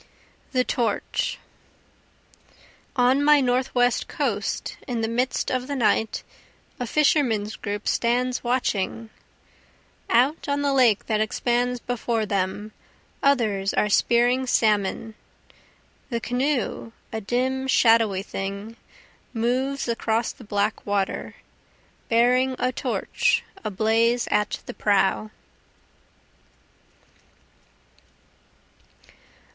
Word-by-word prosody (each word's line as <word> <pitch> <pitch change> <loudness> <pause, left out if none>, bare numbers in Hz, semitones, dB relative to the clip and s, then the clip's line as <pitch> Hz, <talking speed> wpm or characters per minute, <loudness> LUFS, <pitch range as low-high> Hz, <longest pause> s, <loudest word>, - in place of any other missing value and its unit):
The 255 -2 +2
Torch 235 -5 -1 1.6
On 255 +2 +3
my 295 0 +6
Northwest 245 -1 +1
coast 230 -8 -2
in 240 -3 -2
the 225 - 0
midst 245 +3 -1
of 255 0 -1
the 285 - -3
night 225 -3 +1 0.6
a 245 - -3
fishermen's 235 -7 +2
group 205 0 -5
stands 250 +2 0
watching, 230 -3 -1 1.0
Out 265 +7 +2
on 285 0 0
the 280 -1 +1
lake 245 -6 +3
that 215 -1 0
expands 245 +3 0
before 235 -2 -2
them, 200 +1 -2 0.5
others 215 -8 +1
are 210 - +2
spearing 245 +4 +3
salmon, 215 -1 +1 1.0
The 235 -3 -1
canoe, 245 -1 -2 0.2
a 220 - -3
dim 260 +5 -1
shadowy 225 -6 +4
thing, 200 +4 -6 0.6
moves 255 +5 0
across 230 0 0
the - - -14
black 205 0 -1
water, 200 -1 -2 0.7
Bearing 250 +3 +3
a 255 - 0
torch - - 0 0.2
ablaze 225 +4 +1
at 210 -1 0
the - - -7
prow. 205 +1 +1
235 Hz, 95 wpm, -24 LUFS, 215-255 Hz, 1.6 s, my